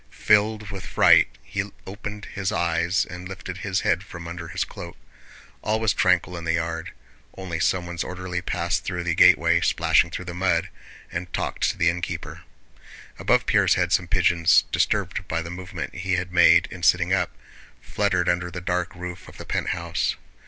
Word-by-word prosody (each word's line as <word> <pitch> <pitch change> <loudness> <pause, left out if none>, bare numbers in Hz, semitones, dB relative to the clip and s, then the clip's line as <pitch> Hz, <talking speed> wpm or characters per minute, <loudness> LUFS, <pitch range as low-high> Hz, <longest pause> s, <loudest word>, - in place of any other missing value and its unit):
Filled 105 0 +2
with 95 -2 -7
fright - - +5 0.2
he 95 +5 -4 0.2
opened 100 +1 -7
his 95 -2 -2
eyes 85 +2 +1
and 90 +1 -9
lifted 90 -1 -7
his 95 -2 -1
head 95 - +1
from 85 -3 -9
under 85 -1 -7
his - - -2
cloak. - - -9 0.6
All 110 +1 0
was 110 -3 +2
tranquil 90 0 +2
in 85 - -6
the 80 0 +1
yard. 80 -1 -3 0.5
Only 90 -4 -4
someone's 85 -1 -1
orderly 90 -1 -5
passed 85 -1 -1
through 90 -2 -3
the 85 -1 0
gateway, - - +5
splashing - - +3
through 90 - -6
the 90 - -6
mud, 85 -2 0 0.4
and 90 -2 -5
talked - - -1
to - - -4
the 85 - +2
innkeeper. 90 0 -5 0.8
Above - - +2
Pierre's - - +3
head 90 0 +1
some 90 - +2
pigeons, 85 -3 +4
disturbed - - 0
by 85 +1 -2
the 85 - -7
movement 90 +1 -6
he 95 0 -3
had 90 0 -2
made 90 - +6
in - - -9
sitting - - +3
up, - - 0 0.4
fluttered 90 -1 0
under 90 0 0
the 90 0 -6
dark 90 0 -2
roof 90 -1 -8
of - - -13
the - - -9
penthouse. 85 0 -1
90 Hz, 175 wpm, -24 LUFS, 85-95 Hz, 0.8 s, made